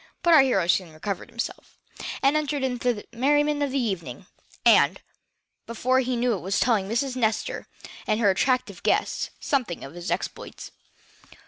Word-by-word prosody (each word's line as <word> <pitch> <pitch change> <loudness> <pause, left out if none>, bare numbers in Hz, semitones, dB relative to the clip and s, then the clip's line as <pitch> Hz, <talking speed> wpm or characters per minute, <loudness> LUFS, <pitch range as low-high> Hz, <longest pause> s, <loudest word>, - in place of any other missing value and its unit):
But 340 -1 +5
our 310 - +9
hero 245 -10 +2
soon 175 -1 +1
recovered 195 +5 -5
himself, 235 0 -6 0.5
and 275 +2 +4
entered 295 -2 -1
into 250 -1 0
the 210 -3 -7
merriment 290 +4 +2
of 285 - +1
the 270 - -2
evening, 190 - -3 0.4
and, - - +5 0.7
before 255 +3 +1
he 255 -1 -1
knew 240 0 +1
it - - -1
he - - -9
was 195 +2 0
telling 215 -6 +2
Miss 250 +4 -1
Nestor 220 -3 -1 0.4
and 215 - +1
her 205 -4 +4
attractive 255 +6 0
guests - - 0
something 250 - -1
of 135 - -9
his 175 +1 -6
exploits. - - -5
240 Hz, 165 wpm, -25 LUFS, 200-270 Hz, 0.7 s, our